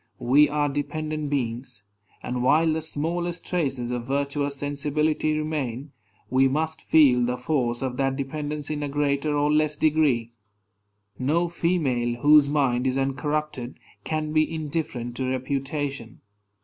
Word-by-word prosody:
We 140 +4 +4
are 150 0 +1
dependent 155 +1 -3
beings; 125 -4 -3 0.4
and 125 0 -3
while 155 +5 +4
the 160 - -1
smallest 170 +3 -3
traces 135 -9 -1
of 120 -1 -4
virtuous 140 +1 -1
sensibility 150 +2 0
remain, 145 -3 -3 0.4
we 130 +1 +3
must 160 +4 -1
feel 135 -6 +5
the 125 +1 -1
force 125 -5 -1
of 125 -1 -3
that 135 -1 +1
dependence 150 +2 -4
in 150 -1 -3
a 145 - -2
greater 145 +1 0
or 145 +1 +2
less 150 0 +2
degree. 145 -7 +2 0.9
No 165 +7 +1
female, 135 -9 0
whose 150 -1 +6
mind 135 -4 +1
is 130 0 0
uncorrupted, 135 -1 -2 0.3
can 155 -1 -2
be 155 +1 +2
indifferent 150 -6 -3
to 130 -1 -1
reputation. 135 -1 -3
145 Hz, 135 wpm, -25 LUFS, 130-155 Hz, 0.9 s, whose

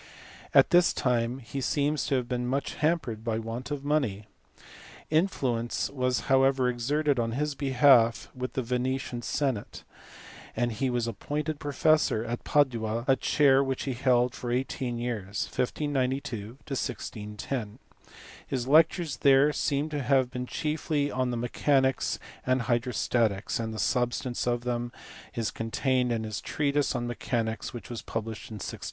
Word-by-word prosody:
At - - +6
this 175 -1 +5
time 120 -1 0
he 135 +2 -6
seems 145 +3 0
to 140 - +1
have 125 -2 -1
been 125 -1 -2
much 135 +3 -1
hampered 150 -9 -1
by 115 -1 -1
want 115 +3 -5
of 145 -1 -4
money. 130 -9 0 0.9
Influence 130 -9 0
was 125 -2 0
however 135 -1 +3
exerted 135 +3 +1
on 115 -1 0
his 150 +3 -1
behalf 130 -4 +4
with 130 0 -5
the 130 - -1
Venetian 125 0 -2
senate, 130 -4 -2 0.7
and 120 +1 0
he 130 +4 -1
was 120 -2 0
appointed 145 +7 -3
professor 145 -5 +2
at 120 +1 -4
Padua, 115 -5 +1
a 135 - +5
chair 135 -1 +4
which 135 -1 -2
he 135 - -2
held 125 0 +2
for 120 - -5
eighteen 125 -1 -2
years 110 -4 -3
(1592 130 -5 -2
1610). 105 -3 -4 0.7
His 130 -2 -2
lectures 160 +2 +4
there 140 +2 +5
seem 145 +1 0
to 150 -2 -2
have 130 -1 +2
been 125 0 -4
chiefly 150 -1 -1
on 130 0 0
mechanics 130 +2 +1 0.3
and 130 0 +1
hydrostatics, 120 -4 0
and 115 -1 -2
the 110 - -6
substance 120 +2 0
of 120 0 +1
them 120 0 -2 0.4
is 115 -2 -1
contained 125 +2 0
in 115 -1 -1
his 110 -2 -4
treatise 145 -1 0
on 120 -1 -1
mechanics 115 -2 -2
which 120 -3 -8
was 115 -3 -5
published 115 -1 -5
in 110 - -7
1612. 105 - -6
125 Hz, 145 wpm, -28 LUFS, 115-140 Hz, 0.9 s, At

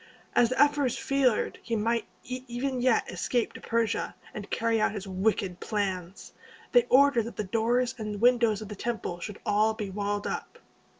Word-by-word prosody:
As 235 - +5
the 255 - -2
ephors 290 -3 +3
feared 270 -5 +1
he 230 - -2
might 230 +2 0 0.2
even 255 +1 -3
yet 250 -2 +3
escape 230 +6 -1
to - - -10
Persia, 230 -2 -1 0.2
and 210 -1 -7
carry 230 -1 +1
out 215 - +2
his 205 -2 -5
wicked 190 -1 0
plans, 190 -3 -3 0.4
they 245 -1 +5
ordered 265 -3 +5
that 235 - -7
the 210 - -2
doors 235 +5 +1
and 210 -2 -4
windows 235 -3 +3
of 210 - -10
the 210 - -6
temple 220 -5 -3
should 205 +3 -7
all 215 +1 +2
be 205 -3 -5
walled 205 +1 -2
up. - - -4
225 Hz, 175 wpm, -28 LUFS, 205-245 Hz, 0.4 s, As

